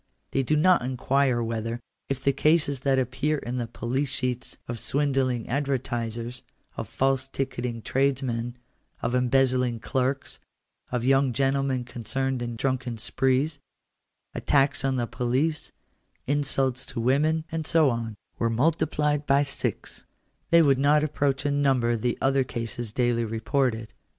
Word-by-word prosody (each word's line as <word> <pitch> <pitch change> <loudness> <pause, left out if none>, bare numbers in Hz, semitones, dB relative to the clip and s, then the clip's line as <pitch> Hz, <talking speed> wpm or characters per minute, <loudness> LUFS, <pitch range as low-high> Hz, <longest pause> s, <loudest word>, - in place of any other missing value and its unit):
They 135 - +1
do 145 +4 +1
not 180 +4 +5
inquire 130 0 +1
whether, 115 +1 -3 0.3
if 135 -1 -3
the 140 - +3
cases 150 -3 +2
that 135 0 +2
Appear 130 +4 0
in 125 -2 -4
the 120 -2 -2
police 130 +5 -2
sheets 125 -1 -2
of 120 -2 -4
swindling 135 -4 0
advertisers, 120 -3 -2 0.3
of - - -5
false 135 0 +1
ticketing 125 -4 -3
trades 135 0 +1
men, 120 -1 -3 0.5
of 120 - 0
embezzling 125 -1 +2
clerks, 130 +4 -2 0.5
of 125 -2 -1
young 135 0 +3
gentlemen 135 -1 +1
concerned 130 +2 -2
in 120 -1 -3
drunken 130 -1 -2
sprees, 135 +6 0 0.7
attacks 140 0 +2
on 135 -1 +1
the 120 -2 0
police, 130 +7 -1 0.5
insults 135 -2 +1
to 130 -3 -5
women, 150 +6 +2
and 160 -1 -2
so 155 -5 +4
on, 115 -2 -3 0.2
were 115 - +2
multiplied 150 +3 +1
by 140 +1 +4
six, 140 - -4 0.4
they 170 0 +6
would 135 -3 +4
not 150 +2 +4
approach 140 -2 0
in 145 0 +1
number 125 -4 +2
the 120 +2 -1
other 135 0 +2
cases 115 -2 -5
daily 120 0 +1
reported. 115 0 -1
130 Hz, 140 wpm, -26 LUFS, 120-140 Hz, 0.7 s, they